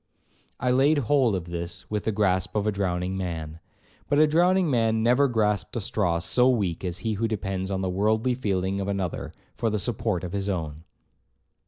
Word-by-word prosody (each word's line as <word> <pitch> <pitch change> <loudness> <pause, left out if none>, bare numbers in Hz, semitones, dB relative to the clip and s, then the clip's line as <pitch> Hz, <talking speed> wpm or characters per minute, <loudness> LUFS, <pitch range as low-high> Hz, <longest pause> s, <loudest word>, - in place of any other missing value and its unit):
I 125 0 +1
laid 140 +4 +4
hold 130 -4 +2
of 90 -3 -4
this 85 0 -6
with 105 -1 -2
the 110 - +1
grasp 95 -3 0
of 105 -1 0
a 105 - +2
drowning 95 -2 -2
man. 80 -4 -4 0.5
But 145 - +2
a 155 - +7
drowning 175 +4 +3
man 115 -5 +1
never 125 +4 +4
grasped 105 -6 0
a - - 0
straw 95 -4 0
so 110 +10 +3
weak 100 -10 0
as 90 -1 -3
he 110 - +1
who 110 +2 -1
depends 95 -3 -3
on 95 -1 -2
the 95 - -1
worldly 110 +6 +1
feeling 100 -5 -1
of 95 - -3
another 95 -4 -3 0.2
for 115 - -1
the 105 - -1
support 110 -3 -1
of 90 +1 -5
his 100 0 -2
own. 80 -4 -4
100 Hz, 195 wpm, -26 LUFS, 90-115 Hz, 0.5 s, a